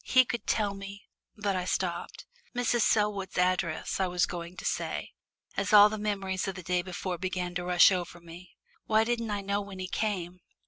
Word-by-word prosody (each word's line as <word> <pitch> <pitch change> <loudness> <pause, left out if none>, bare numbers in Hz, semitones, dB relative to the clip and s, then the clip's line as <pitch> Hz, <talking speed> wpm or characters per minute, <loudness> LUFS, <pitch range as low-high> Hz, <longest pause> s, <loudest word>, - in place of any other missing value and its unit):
He 255 0 +5
could 235 +1 -4
tell 210 -3 +1
me 195 0 -9 0.2
" - - -44
but 200 -2 +1
I 180 -1 -1
stopped. - - -3 0.3
"Mrs. 240 -1 +1
Selwood's 210 -3 +1
address" 180 -2 0
I 190 - +2
was 180 0 +2
going 175 +1 -7
to - - -7
say, - - -2 0.4
as 195 +2 -1
all 205 0 +10
the 215 0 -4
memories 195 -2 -2
of 195 - -3
the 180 - -8
day 180 +1 +1
before 180 0 -4
began 180 -1 -2
to 180 0 -3
rush 180 +2 +6
over 175 -2 -3
me. 170 +1 -13 0.3
"Why 220 0 +4
didn't 230 -1 -1
I 205 -1 -1
know 200 +1 -1
when 200 -1 -9
he 185 0 -4
came?" 185 -4 -2
190 Hz, 200 wpm, -29 LUFS, 180-210 Hz, 0.4 s, all